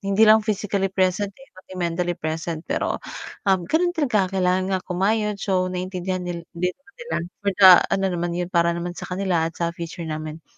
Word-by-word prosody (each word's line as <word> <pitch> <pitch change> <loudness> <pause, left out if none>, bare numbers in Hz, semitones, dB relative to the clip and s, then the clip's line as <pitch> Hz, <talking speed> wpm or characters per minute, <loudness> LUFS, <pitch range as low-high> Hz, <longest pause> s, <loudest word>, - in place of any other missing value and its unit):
hindi 200 +1 +1
lang 220 0 +7
physically 205 -2 0
present, 190 +1 +1
eh, 270 - -17
pati 185 - -14
mentally 175 +1 -1
present. 160 0 -4
Pero, 290 - -1 0.5
um, 190 - +4
gano'n 345 +3 +2
talaga 215 - +1
kailangan 185 0 +2
nga - - -10
kumayod. 210 +3 +1
So 185 -2 +1
naiintindihan 185 0 -3
nil 175 -1 -5
din 180 +2 0
naman 400 +8 -24
nila - - -3 0.3
for 200 - +1
the 190 -2 +10 0.2
ano 195 - +1
naman 175 0 -2
'yon, 175 0 -1
para 170 -1 +3
naman 170 +1 -4
sa - - -8
kanila 180 -2 0
at 165 - -14
sa 170 0 -1
future 170 -1 -6
namin. 155 0 -5
185 Hz, 195 wpm, -23 LUFS, 170-200 Hz, 0.5 s, the